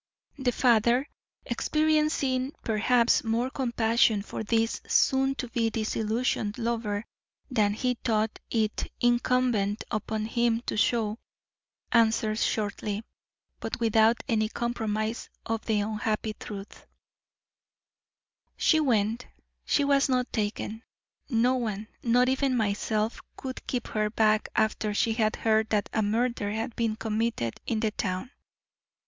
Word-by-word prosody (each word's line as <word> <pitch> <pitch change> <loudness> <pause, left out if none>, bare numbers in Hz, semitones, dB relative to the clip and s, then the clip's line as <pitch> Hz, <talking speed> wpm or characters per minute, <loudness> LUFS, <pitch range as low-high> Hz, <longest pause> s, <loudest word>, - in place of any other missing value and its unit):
The 260 -2 +1
father, 240 +2 +3 0.4
experiencing, 305 -4 +1
perhaps, 235 +2 +3
more 235 +3 0
compassion 230 -4 +2
for 220 - -5
this 225 +1 0
soon 270 0 +3
to 255 - -4
be 230 -1 +1
disillusioned 220 0 -1
lover 225 -3 -2 0.5
than 210 -4 +2
he 250 +2 0
thought 220 -1 0
it 220 -2 -1
incumbent 240 -4 +2
upon 215 0 -2
him 235 0 +1
to - - -4
show, 220 0 +1 0.7
answered 220 -2 +3
shortly, 210 -1 -1 0.6
but - - -4
without 225 0 +3
any 215 -2 +1
compromise 220 -1 -2 0.2
of 225 0 -2
the 215 -2 +2
unhappy 215 +1 -2
truth: 200 -1 -9 1.7
"She 315 - +4
went; 230 -4 +1 0.4
she 290 - +2
was 280 -1 +3
not 250 -1 0
taken. 215 0 -2 0.5
No 245 0 +3
one, 215 -3 -3
not 245 +1 +3
even 265 0 +1
myself, 215 +1 -1 0.2
could 260 -1 -7
keep 245 -2 -2
her 215 -1 0
back 215 0 +2
after 220 -2 +1
she 225 +1 +2
had 220 -1 +1
heard 220 -1 +2
that 210 -2 0
a 220 - +2
murder 220 0 0
had 225 +1 -3
been 225 -2 0
committed 220 - -2
in 220 -2 0
the 220 -2 +1
town. 190 +4 -3
225 Hz, 125 wpm, -28 LUFS, 215-245 Hz, 1.7 s, She